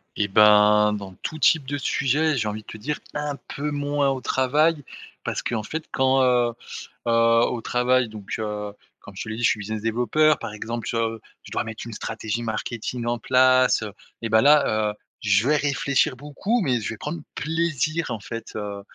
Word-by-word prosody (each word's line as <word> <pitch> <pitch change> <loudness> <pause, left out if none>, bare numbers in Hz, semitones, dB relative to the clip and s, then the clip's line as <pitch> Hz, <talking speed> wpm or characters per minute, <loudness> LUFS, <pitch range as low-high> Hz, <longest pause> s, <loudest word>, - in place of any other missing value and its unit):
Et 100 - 0
ben, 105 +1 +5
dans 100 -2 -6
tout 155 - -4
type 155 -2 +3
de 145 +1 -2
sujet 145 +2 +1
j'ai 110 - -1
envie 105 +1 -4
de - - -29
te 110 - -8
dire 150 +8 -3
un 150 -1 -3 0.2
peu 150 +2 -2
moins 145 -1 0
au 130 -1 -2
travail 150 +4 +2 0.4
parce - - -2
qu'en 110 -3 -2
fait 160 +8 -5
quand, 130 0 +3
heu 120 -2 +3 0.5
heu, - - +3 0.3
au 120 - -3
travail 125 +1 +2
donc 105 -2 -6
heu, 105 -1 -4 0.3
comme 100 - -14
je - - -5
te - - -8
l'ai 110 - -4
dit 120 - -5
je - - +5
suis 110 - 0
business 110 +1 -4
développeur. 125 +7 +2
Par 115 -2 -6
exemple 115 0 -5
sur, 115 - -1
heu, 115 -1 -2 0.2
je - - -13
dois - - -1
mettre 110 -1 -7
une 115 - -7
stratégie 110 +1 -4
marketing 115 +2 -4
en 120 0 -1
place, 130 0 +4
heu, 105 -2 -6 0.3
et 115 - -3
bah 110 0 +5
là, 135 -7 +4
heu, - - -9 0.3
je 105 +3 +2
vais 150 - +4
réfléchir 140 -1 +1
beaucoup 150 - -2
mais 130 -8 +1
je - - -3
vais 115 - -6
prendre 165 +8 -5
plaisir 160 0 -1
en 115 - -3
fait, 115 +2 -8
heu 100 -1 -5
120 Hz, 205 wpm, -24 LUFS, 110-145 Hz, 0.5 s, ben